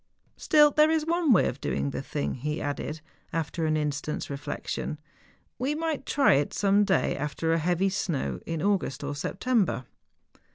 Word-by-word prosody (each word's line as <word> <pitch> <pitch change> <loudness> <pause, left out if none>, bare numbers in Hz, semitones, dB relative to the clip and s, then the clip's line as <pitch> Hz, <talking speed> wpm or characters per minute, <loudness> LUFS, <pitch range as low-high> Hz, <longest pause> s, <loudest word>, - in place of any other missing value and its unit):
Still 295 -1 +5
there 305 +2 +5
is 320 -1 +1
one 335 -2 +2
way 205 - +5
of - - -5
doing 70 0 -1
the - - -4
thing,' 70 0 -3
he 150 +5 -3
added, 145 +2 -4 0.3
after 160 0 -2
an 155 0 +2
instant's 150 0 -3
reflection, 140 +2 -4 0.3
' - - -37
we 270 +4 0
might 315 -3 -2
try 280 -1 +4
it 140 +1 +1
some 200 0 +3
day 195 -2 +1
after 150 +3 -1
a 165 - +2
heavy 180 +4 +1
snow, 185 -7 -2
in 165 -1 -2
August 190 -9 0
or 145 +1 -3
September. 190 - 0
165 Hz, 170 wpm, -27 LUFS, -, 0.3 s, Still